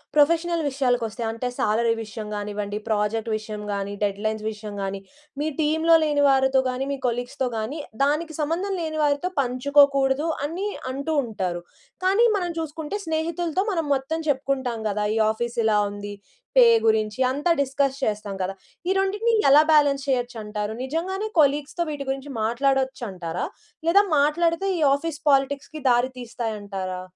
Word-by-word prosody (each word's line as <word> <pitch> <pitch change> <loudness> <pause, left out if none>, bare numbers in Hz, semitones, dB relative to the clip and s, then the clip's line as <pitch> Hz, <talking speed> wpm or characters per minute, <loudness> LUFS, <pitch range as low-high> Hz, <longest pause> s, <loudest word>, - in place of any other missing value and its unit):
Professional 330 +2 +3
విషయాలకొస్తే 245 -4 -1
అంటే, 230 +2 -3
salary 230 +2 +2
విషయం 215 0 -7
గానివ్వండి, 205 0 -4
ప్రాజెక్ట్ 215 +1 0
విషయం 215 -1 -7
గాని, 200 0 -3
డెడ్‌లైన్స్ 215 +2 -1
విషయం 210 -1 -8
గాని, 195 0 -4 0.4
మీ 305 - 0
టీమ్‌లో 320 +2 +4
లేని 290 -1 +2
వారితో 265 0 +4
గాని, 260 +2 -3
మీ 280 - -2
కొలీగ్స్‌తో 245 +2 -2
గాని 255 +9 -3 0.2
దానికి 305 +2 0
సంబంధం 345 +6 -1
లేని 315 -1 -3
వారితో 295 +5 +1
పంచుకోకూడదు 275 +3 +3 0.2
అని 360 +7 -3 0.2
అంటూ 280 +4 -2
ఉంటారు. 185 -6 -3 0.4
కానీ, 425 +5 +5
మనం 350 -2 -2
చూసుకుంటే 320 +4 -4
స్నేహితులతో 330 +3 -1
మనం 325 -4 -1
మొత్తం 315 +5 -3
చెప్పుకుంటాం 260 -4 -1
కదా! 210 +1 -1
ఈ - - +2
ఆఫీస్ 235 +2 -4
ఇలా 210 -1 +4
ఉంది. 205 0 -7 0.4
పే 250 - +10 0.2
గురించి 220 +2 +1
అంతా 290 +6 0
డిస్కస్ 275 0 +1
చేస్తాం 210 -3 -2
కదా! 185 +1 -2 0.4
ఈ - - +3
రెండిటిని 415 +4 +1 0.2
ఎలా 290 +2 +8
బాలన్స్ 285 -2 +4
చేయొచ్చంటారు? 220 -5 -2
నిజంగానే 370 +9 -2
కొలీగ్స్‌తో 295 +3 +2
వీటి 285 -2 -4
గురించి 270 +1 -3
మాట్లాడొచ్చంటారా? 235 -8 -1 0.4
లేదా 400 +4 +6 0.2
మాట్లాడితే 335 +6 +2
ఈ - - -3
ఆఫీస్ 300 +1 -3
పాలిటిక్స్‌కి 280 +3 0
దారి 245 +1 +3
తీస్తాయంటారా? 205 -6 -4
270 Hz, 140 wpm, -24 LUFS, 220-310 Hz, 0.4 s, పే